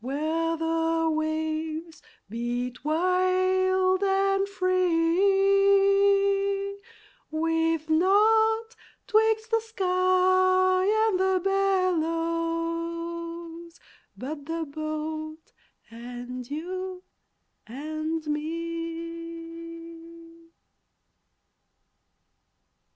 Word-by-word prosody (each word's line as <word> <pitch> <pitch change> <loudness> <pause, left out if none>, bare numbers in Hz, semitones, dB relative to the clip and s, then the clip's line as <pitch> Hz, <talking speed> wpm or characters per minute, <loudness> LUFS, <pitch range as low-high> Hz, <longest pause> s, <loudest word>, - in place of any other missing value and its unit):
where 315 +6 -1
the 325 0 0
waves 315 +1 -3 0.3
beat 240 +3 -4
wild 370 +3 +2
and 390 0 +2
free, 395 +2 +3 0.6
With 325 0 0
naught 440 +7 +3 0.3
'twixt 445 +1 +2
the 455 - +3
sky 370 -2 +2 0.2
and 385 -4 +1
the 380 0 +2
billows 335 -2 -2 0.4
but 285 +2 -7
the 330 0 -3
boat, 310 +1 -6 0.4
and 245 +1 -8
you 365 +4 -5 0.6
and 310 +5 -4
me! 335 +1 -7
335 Hz, 55 wpm, -26 LUFS, 320-375 Hz, 0.6 s, free